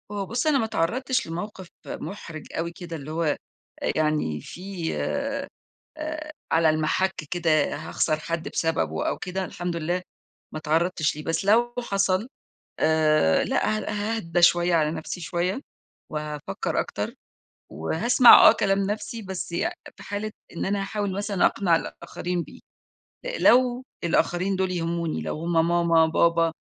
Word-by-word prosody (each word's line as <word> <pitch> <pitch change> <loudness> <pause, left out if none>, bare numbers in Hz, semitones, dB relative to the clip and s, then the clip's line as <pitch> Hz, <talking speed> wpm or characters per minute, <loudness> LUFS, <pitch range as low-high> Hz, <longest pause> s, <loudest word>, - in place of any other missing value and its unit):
هو 200 -1 -3
بُصّ، 240 +9 -1
أنا 300 -2 +4
ما 225 - +1
اتعرّضتش 250 +7 0
لموقف 185 +3 -6 0.2
محرج 165 -6 -7
أوي 170 +1 -2
كده، 170 -1 -8
اللي 150 -1 -7
هو 165 +1 -1
آآ، 150 -2 +1 0.6
يعني 150 - 0
في 180 - -5
آآ، 280 0 -3 0.9
على 165 0 +4
المَحَكّ 155 +4 0
كده، 160 -4 +2
هاخسر 155 -1 -1
حد 165 +1 -3
بسببُه 80 - -1
أو - - -1
كده، 185 +1 -3
الحمد 175 -1 -4
لله 170 +2 -1 0.5
ما 155 - -5
اتعرّضتش 160 +1 +1
ليه، 150 - -7
بس 165 +4 -1
لو 235 +4 +4
حصل 195 -2 0 0.5
آآ، 155 - +3
لأ 215 - +1
ها 210 +1 -2
هاهدى 175 -5 -1
شوية 175 0 +5
على 155 -2 +2
نَفْسي 165 +2 -5
شوية 175 +7 -1 0.5
وهافكّر 150 -7 -3
أكتر - - -3 0.6
وهاسمع 230 - +7
آه - - +8
كلام 195 0 +1
نَفْسي، 210 +3 -3
بس 190 -3 -5
يع 170 - 0 0.2
في - - -12
حالة 205 +1 -4 0.2
إن - - -2
أنا 200 +1 0
هاحاول 200 0 -2
مثلًا 200 -2 +2
أقنع 175 -4 +2
الآخرين 175 +1 -4
بيه - - -13 0.6
أ - - -3
لو 250 0 +4 0.2
الآخرين 175 +3 +1
دوُل 190 0 0
يهموني، 170 -2 -2
لو - - -4
هم 165 0 +2
ماما، 170 -1 +4
بابا، 165 0 +3
175 Hz, 145 wpm, -25 LUFS, 160-200 Hz, 0.9 s, آه